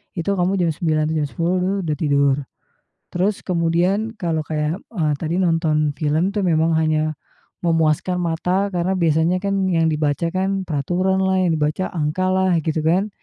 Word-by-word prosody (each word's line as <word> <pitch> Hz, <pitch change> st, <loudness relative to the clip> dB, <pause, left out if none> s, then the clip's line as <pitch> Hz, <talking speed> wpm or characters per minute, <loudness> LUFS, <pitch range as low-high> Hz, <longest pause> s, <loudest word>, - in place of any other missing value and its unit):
Itu 190 Hz, +3 st, -1 dB
kamu 180 Hz, +2 st, +1 dB
jam 170 Hz, -, +2 dB
21.00 155 Hz, -1 st, 0 dB
jam 155 Hz, -2 st, 0 dB
22.00 170 Hz, +5 st, -1 dB
tuh 185 Hz, +2 st, 0 dB
dah 150 Hz, -, -1 dB
tidur, 140 Hz, -2 st, +2 dB, 0.8 s
terus 190 Hz, +3 st, -1 dB
kemudian 180 Hz, +6 st, 0 dB
kalau 165 Hz, -3 st, -1 dB
kayak, 155 Hz, +3 st, -2 dB, 0.2 s
eee, 155 Hz, -4 st, +1 dB
tadi 165 Hz, +1 st, -2 dB
nonton 165 Hz, -4 st, +1 dB
film 155 Hz, +6 st, 0 dB
tuh 210 Hz, -, 0 dB
memang 165 Hz, -2 st, +2 dB
hanya 155 Hz, 0 st, +1 dB, 0.5 s
memuaskan 165 Hz, +1 st, +1 dB
mata 180 Hz, +4 st, 0 dB
karena 180 Hz, +2 st, 0 dB
biasanya 165 Hz, 0 st, +2 dB
kan 200 Hz, -, 0 dB, 0.2 s
yang 165 Hz, -2 st, +2 dB
dibaca 150 Hz, +2 st, 0 dB
kan 190 Hz, +1 st, -1 dB
peraturan 180 Hz, +5 st, 0 dB
lah, 190 Hz, 0 st, +2 dB
yang 175 Hz, -, +2 dB
dibaca 155 Hz, +5 st, -1 dB
angka 160 Hz, +2 st, -1 dB
lah 185 Hz, -2 st, +2 dB
gitu 160 Hz, -1 st, 0 dB
kan. 180 Hz, +6 st, +2 dB
170 Hz, 165 wpm, -21 LUFS, 155-185 Hz, 0.8 s, jam